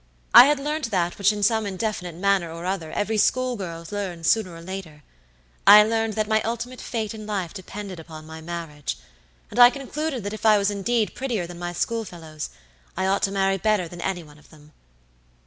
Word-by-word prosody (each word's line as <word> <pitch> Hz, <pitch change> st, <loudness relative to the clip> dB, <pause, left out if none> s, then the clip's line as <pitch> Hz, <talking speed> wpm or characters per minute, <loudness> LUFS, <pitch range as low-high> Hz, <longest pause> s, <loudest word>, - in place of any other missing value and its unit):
I -, -, +12 dB
had 295 Hz, 0 st, +3 dB
learnt 295 Hz, -2 st, -2 dB
that 175 Hz, -3 st, -1 dB
which 200 Hz, +1 st, +4 dB
in 210 Hz, -1 st, -4 dB
some 220 Hz, 0 st, +2 dB
indefinite 190 Hz, -3 st, -3 dB
manner 190 Hz, -2 st, +1 dB
or 170 Hz, +1 st, -7 dB
other 180 Hz, -4 st, -3 dB
every 215 Hz, +1 st, -1 dB
school 255 Hz, +3 st, +2 dB
girl 170 Hz, -5 st, -6 dB
learns 185 Hz, -5 st, -4 dB
sooner 190 Hz, -6 st, 0 dB
or -, -, -9 dB
laterI 175 Hz, -5 st, -7 dB, 0.7 s
learned 220 Hz, +1 st, +7 dB
that 215 Hz, 0 st, -1 dB
my 220 Hz, 0 st, +2 dB
ultimate 240 Hz, +3 st, -4 dB
fate 225 Hz, -3 st, -3 dB
in 215 Hz, -1 st, -8 dB
life 195 Hz, -5 st, -3 dB
depended 195 Hz, -1 st, -7 dB
upon 155 Hz, -1 st, -10 dB
my 160 Hz, 0 st, -9 dB
marriage, 160 Hz, -, -5 dB, 0.5 s
and -, -, -3 dB
I 245 Hz, 0 st, +10 dB
concluded 275 Hz, 0 st, -4 dB
that 205 Hz, +1 st, -4 dB
if 215 Hz, -, -8 dB
I 215 Hz, -1 st, +6 dB
was 200 Hz, 0 st, +1 dB
indeed 210 Hz, +1 st, 0 dB
prettier 240 Hz, -9 st, -2 dB
than 175 Hz, 0 st, -10 dB
my 175 Hz, 0 st, -3 dB
schoolfellows, 175 Hz, -6 st, -4 dB, 0.5 s
I 190 Hz, -, 0 dB
ought 195 Hz, +1 st, +1 dB
to 195 Hz, -, +1 dB
marry 195 Hz, 0 st, +1 dB
better 210 Hz, -3 st, +1 dB
than 175 Hz, +1 st, -9 dB
any 180 Hz, -2 st, -2 dB
one 150 Hz, -1 st, -16 dB
of -, -, -21 dB
them. 150 Hz, -1 st, -18 dB
200 Hz, 200 wpm, -24 LUFS, 170-220 Hz, 0.7 s, I